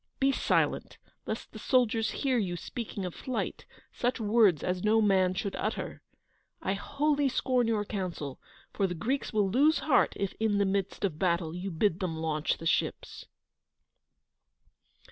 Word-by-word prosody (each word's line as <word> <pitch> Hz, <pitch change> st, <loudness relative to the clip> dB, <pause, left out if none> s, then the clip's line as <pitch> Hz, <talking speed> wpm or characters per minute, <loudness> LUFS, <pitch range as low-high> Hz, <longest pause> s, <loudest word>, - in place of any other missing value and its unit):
Be 275 Hz, 0 st, +4 dB
silent, -, -, 0 dB, 0.3 s
lest -, -, -4 dB
the -, -, -9 dB
soldiers 230 Hz, -4 st, +2 dB
hear 260 Hz, -4 st, 0 dB
you 180 Hz, -5 st, -1 dB
speaking 210 Hz, -1 st, -5 dB
of 180 Hz, -, -4 dB
flight, 255 Hz, -, -4 dB, 0.3 s
such 245 Hz, +1 st, -1 dB
words 210 Hz, -7 st, +4 dB
as 180 Hz, 0 st, -1 dB
no 215 Hz, +1 st, +4 dB
man 190 Hz, -3 st, +3 dB
should 195 Hz, +1 st, -3 dB
utter. -, -, -3 dB, 0.6 s
I 190 Hz, -, -1 dB
wholly 285 Hz, +6 st, +1 dB
scorn 250 Hz, -2 st, +1 dB
your 215 Hz, -2 st, 0 dB
counsel, 175 Hz, -9 st, -4 dB, 0.3 s
for 195 Hz, -, +1 dB
the 180 Hz, -, -4 dB
Greeks 255 Hz, -, -2 dB
will 210 Hz, -3 st, +2 dB
lose 295 Hz, +7 st, +4 dB
heart 300 Hz, -, +3 dB
if, 200 Hz, -2 st, -2 dB
in 220 Hz, -2 st, +2 dB
the 200 Hz, -, +3 dB
midst 195 Hz, +1 st, -1 dB
of 160 Hz, -5 st, -3 dB
battle, 170 Hz, -3 st, 0 dB
you 185 Hz, +2 st, -4 dB
bid 175 Hz, +1 st, +1 dB
them 175 Hz, -4 st, -2 dB
launch 155 Hz, -1 st, -1 dB
the 165 Hz, -, -9 dB
ships." -, -, -1 dB
200 Hz, 160 wpm, -29 LUFS, 180-240 Hz, 0.6 s, Be